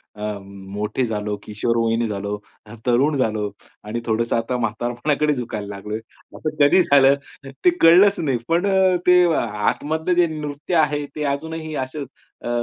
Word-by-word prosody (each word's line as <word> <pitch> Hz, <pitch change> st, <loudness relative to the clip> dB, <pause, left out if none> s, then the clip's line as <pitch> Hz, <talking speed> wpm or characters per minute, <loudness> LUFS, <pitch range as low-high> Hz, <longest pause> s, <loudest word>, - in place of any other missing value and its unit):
अ, 105 Hz, -, -11 dB, 0.2 s
मोठे 100 Hz, +5 st, -4 dB
झालो, 105 Hz, -2 st, -3 dB
किशोर 115 Hz, +3 st, -1 dB
वयीन 115 Hz, 0 st, +1 dB
झालो, 100 Hz, 0 st, -3 dB, 0.3 s
हं, 110 Hz, -, -10 dB
तरुण 135 Hz, +5 st, +2 dB
झालो 110 Hz, -4 st, 0 dB, 0.3 s
आणि 110 Hz, +3 st, -4 dB
थोडंसं 115 Hz, +1 st, 0 dB
आता 120 Hz, +2 st, -1 dB
म्हातारपणाकडे 120 Hz, +6 st, 0 dB
झुकायला 110 Hz, -5 st, -5 dB
लागलोय. 105 Hz, +2 st, -5 dB, 0.4 s
असं 155 Hz, -1 st, -4 dB
कधी 145 Hz, +6 st, +6 dB
झालं 140 Hz, -3 st, +5 dB, 0.5 s
ते -, -, +9 dB
कळलंच 185 Hz, +5 st, +6 dB
नाही 135 Hz, -6 st, 0 dB
पण 170 Hz, +4 st, +1 dB
अ, 190 Hz, -2 st, +3 dB
ते, 180 Hz, 0 st, +7 dB
आतमधलं 145 Hz, -, -1 dB
जे 175 Hz, -1 st, +4 dB
नृत्य 150 Hz, +4 st, -4 dB
आहे 150 Hz, -2 st, +2 dB
ते 150 Hz, -, -3 dB
अजूनही 160 Hz, +1 st, -5 dB
असं 140 Hz, +2 st, -6 dB, 0.4 s
अ, -, -, -2 dB
130 Hz, 150 wpm, -21 LUFS, 110-155 Hz, 0.5 s, ते